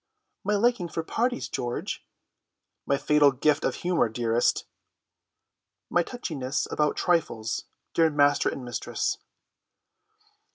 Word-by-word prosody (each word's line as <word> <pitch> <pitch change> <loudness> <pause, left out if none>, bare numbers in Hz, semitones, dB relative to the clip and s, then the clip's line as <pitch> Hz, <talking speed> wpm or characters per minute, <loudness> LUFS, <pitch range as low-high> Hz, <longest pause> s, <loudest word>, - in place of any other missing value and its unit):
"My 210 +2 +1
liking 220 -3 +2
for 165 - -3
parties, 245 +8 -1
George." 120 -1 -3 0.8
"My 140 - +3
fatal 145 0 +4
gift 145 +3 +2
of - - 0
humour, 175 -9 +3
dearest." 115 +1 +1 1.3
"My 175 - +4
touchiness 150 - -3
about 150 -1 +1
trifles, 150 -11 0 0.3
dear 165 -1 +4
master 145 -1 +3
and 130 - -6
mistress." 120 - -2
150 Hz, 110 wpm, -27 LUFS, 130-175 Hz, 1.3 s, fatal